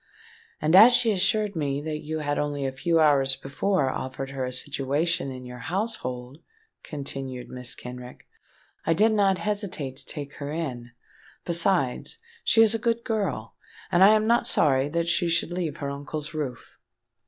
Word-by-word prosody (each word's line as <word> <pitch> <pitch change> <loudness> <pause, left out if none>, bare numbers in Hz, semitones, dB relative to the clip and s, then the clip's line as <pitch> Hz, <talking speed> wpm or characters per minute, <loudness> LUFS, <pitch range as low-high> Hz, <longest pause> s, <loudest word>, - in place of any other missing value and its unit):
"And 155 +3 +2
as 225 +6 +9
she 240 -2 +5
assured 205 +1 +1
me 140 -3 -1
that 150 +1 -4
you 155 +1 -4
had 145 -1 -1
only 145 -1 -2
a 135 - -1
few 165 +5 +1
hours 140 -3 +4
before 140 +1 -1
offered 135 +1 -5
her 135 -1 -3
a 125 - -3
situation 140 +4 0
in 130 -1 -8
your 125 0 -9
household," 145 - -4 0.4
continued 135 -3 -6
Mrs. 125 -1 -3
Kenrick, 125 0 -10 0.6
"I 165 - +2
did 215 +5 +4
not 200 -3 +3
hesitate 185 -11 -3
to 135 - -4
take 145 -2 -6
her 145 0 -5
in. 130 -7 -4 0.6
Besides, 170 -6 +1 0.3
she 225 - +5
is 220 -1 +4
a 225 - 0
good 230 +1 0
girl, 195 - -2 0.4
and 175 +2 +5
I 210 +3 +8
am 215 0 +1
not 235 +2 +2
sorry 135 -1 +2
that 170 +2 -1
she 170 0 +1
should 170 +1 0
leave 165 -4 -3
her 140 -3 -4
uncle's 145 +2 -6
roof." 140 -6 -6
150 Hz, 170 wpm, -26 LUFS, 135-190 Hz, 0.6 s, as